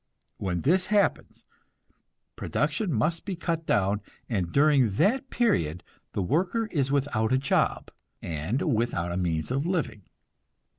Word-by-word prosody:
When 90 -3 -2
this 180 +6 +2
happens, 205 0 0 0.9
production 215 -6 -1
must 155 +7 0
be 195 - -4
cut 165 -2 -3
down, 100 +1 +2 0.3
and 95 -7 -1
during 140 -4 +4
that 255 - +2
period 90 - +1 0.3
the 100 - -1
worker 180 - +1
is 140 -4 0
without 130 -6 +1
a 130 - +4
job, 135 +1 0 0.3
and 85 - -2
without 90 -6 -1
means 80 +1 -1
of 140 +5 0
living. 170 - -1
135 Hz, 130 wpm, -27 LUFS, -, 0.9 s, during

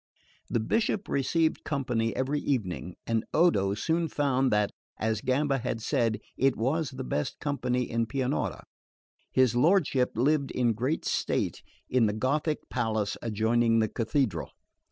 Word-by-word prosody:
The - - +1
Bishop 210 - 0
received 160 +4 +1
company 125 -6 -1
every 135 +3 0
evening; 95 -11 -2
and 115 -1 0
Odo 100 - +3
soon 165 +9 0
found 135 -3 +1
that, 105 -1 +2 0.3
as 110 -1 -1
Gamba 135 +1 +1
had 120 -1 -3
said, 115 0 0 0.2
it 135 +1 +2
was 140 +6 0
the 130 0 -6
best 75 -11 -2
company 125 -4 -1
in 115 0 -1
Pianura. 125 - -2 0.7
His 130 -2 +3
lordship 140 -3 +3
lived 140 +3 +2
in 120 -2 +1
great 130 +8 -1
state - - -1 0.3
in 125 -3 +3
the 105 - 0
Gothic 150 +7 -1
palace 110 -4 -1
adjoining 115 +1 +2
the 110 -1 +2
Cathedral. 110 - -1
125 Hz, 140 wpm, -28 LUFS, 110-140 Hz, 0.7 s, Odo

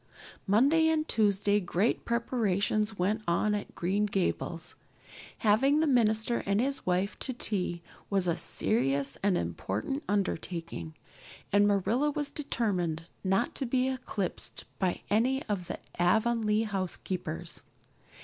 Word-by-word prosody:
Monday 280 +11 +4
and 315 -1 +1
Tuesday 205 -1 +2
great 190 +4 0
preparations 215 -3 0
went 205 +5 +1
on 170 +5 +2
at 205 -1 -4
Green 200 +4 +1
Gables. 175 -4 -2 0.6
Having 260 +8 +4
the 320 - +3
minister 235 -4 +2
and 200 +1 +2
his 275 -1 -1
wife 185 +3 0
to 260 - -3
tea 180 -7 -2 0.3
was 195 -2 +1
a 170 -2 +2
serious 140 -10 0
and 195 -2 +2
important 95 - -2
undertaking, 170 - -2 0.6
and 205 +1 +5
Marilla 215 +8 +2
was 290 -1 -3
determined 180 - -2
not 195 +5 +1
to 270 - -3
be 255 +1 +2
eclipsed 245 -7 -4
by 185 -2 0
any 255 +6 +2
of 195 -5 -3
the - - -4 0.2
Avonlea 220 +3 +3
housekeepers. 185 - -3
205 Hz, 125 wpm, -30 LUFS, 180-235 Hz, 0.6 s, and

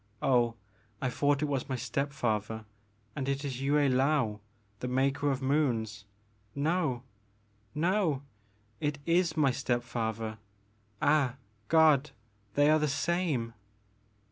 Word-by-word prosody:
Oh 120 -3 +3 0.4
I 130 - -1
thought 145 +2 +1
it - - +1
was 140 -2 -2
my 130 - 0
step 140 +3 -2
father 110 -4 -2 0.5
and 135 -1 -2
it 140 +1 -1
is 130 -2 -4
Yue 140 +1 +1
I^aou 135 -5 +2 0.4
the 125 - -3
Maker 135 +3 +1
of 135 -1 -1
Moons 115 -8 0 0.2
— - - -37 0.2
no! 150 -4 0 0.7
no! 165 -3 +1 0.6
it 145 0 -1
is 170 -1 +2
my 140 -3 +4
step 120 -2 -1
father 110 -2 -3 0.3
— 105 -1 -38
ah 145 -4 +3 0.3
God! 155 -3 +5 0.5
they 145 0 +5
are 155 - +5
the 150 - +1
same 145 -6 0
135 Hz, 135 wpm, -30 LUFS, 120-150 Hz, 0.7 s, God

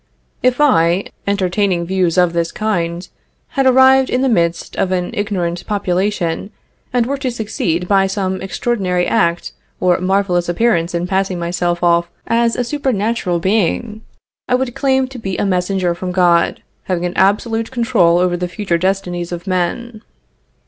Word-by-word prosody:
If 255 +1 +2
I, 185 - +3 0.2
entertaining 190 -2 0
views 185 -1 0
of 180 -2 +3
this 170 -1 -1
kind, 175 -5 -2 0.4
had 270 -3 +1
arrived 265 +1 +5
in 250 - 0
the 265 - +2
midst 170 -6 0
of 185 - 0
an 180 -1 -1
ignorant 185 -6 -2
population, 195 -2 -1 0.4
and 245 -2 +1
were 275 +2 -3
to 265 -2 -1
succeed 205 -7 -2
by 195 -1 +3
some 190 -1 -2
extraordinary 190 -3 -1
act 170 0 0 0.3
or 180 -1 +2
marvelous 185 -2 +1
appearance 175 -3 +1
in 170 +1 -1
passing 190 0 -1
myself 175 0 -2
off 170 0 +3 0.2
as 230 0 +1
a 250 - 0
supernatural 230 -8 -1
being, 210 +4 0 0.5
I 250 - +3
would 255 -1 -1
claim 265 -1 +1
to 260 -1 -9
be 195 -4 -4
a - - 0
messenger 185 -1 0
from 180 +1 -5
God, 175 -2 +2 0.2
having 180 -2 -1
an 175 - -2
absolute 225 +3 +1
control 230 -9 +2
over 180 0 +1
the 180 0 -3
future 175 -2 -2
destinies 180 -2 -2
of 175 0 -6
men. 205 +5 -2
190 Hz, 155 wpm, -17 LUFS, 175-225 Hz, 0.5 s, arrived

